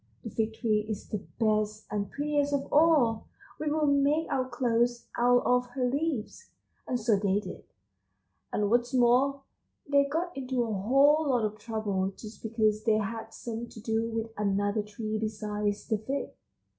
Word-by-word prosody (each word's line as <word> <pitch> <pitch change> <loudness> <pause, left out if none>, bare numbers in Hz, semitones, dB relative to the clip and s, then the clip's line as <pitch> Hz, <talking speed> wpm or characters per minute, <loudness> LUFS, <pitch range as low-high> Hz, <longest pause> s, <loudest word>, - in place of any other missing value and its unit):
The 225 - -6
Fig 220 0 -1
tree 215 -2 +1
is 210 -2 -5
the 210 - -2 0.2
best 215 -1 +1
and 205 -1 -2
prettiest 290 0 0
of 275 - -4
all. 290 -8 +4 0.3
We 305 - -1
will 305 0 +1
make 285 +2 +3
our 255 -1 0
clothes 240 -1 +1
out 245 +1 +4
of 250 0 +3
her 255 -2 +1
leaves. 285 - -2 0.4
And 250 - -1
so 220 -2 +3
they 200 0 +2
did, 185 -3 -8 0.9
and 205 0 0
what's 240 +1 +2
more, 260 +3 +3 0.4
they 280 0 +4
got 335 +5 -2
into 260 -2 -1
a 225 -2 -2
whole 275 +9 +4
lot 245 -4 +2
of 215 0 -4
trouble 210 -4 -2
just 215 0 -10
because 215 -1 +1
they 220 -1 +3
had 225 +1 -4
something 235 +1 -6
to - - -11
do 225 +1 -1
with 225 0 -3
another 205 +1 +1
tree 215 +1 -4
besides 210 -1 -2
the 220 - 0
Fig." 270 +6 -3
230 Hz, 170 wpm, -29 LUFS, 215-270 Hz, 0.9 s, all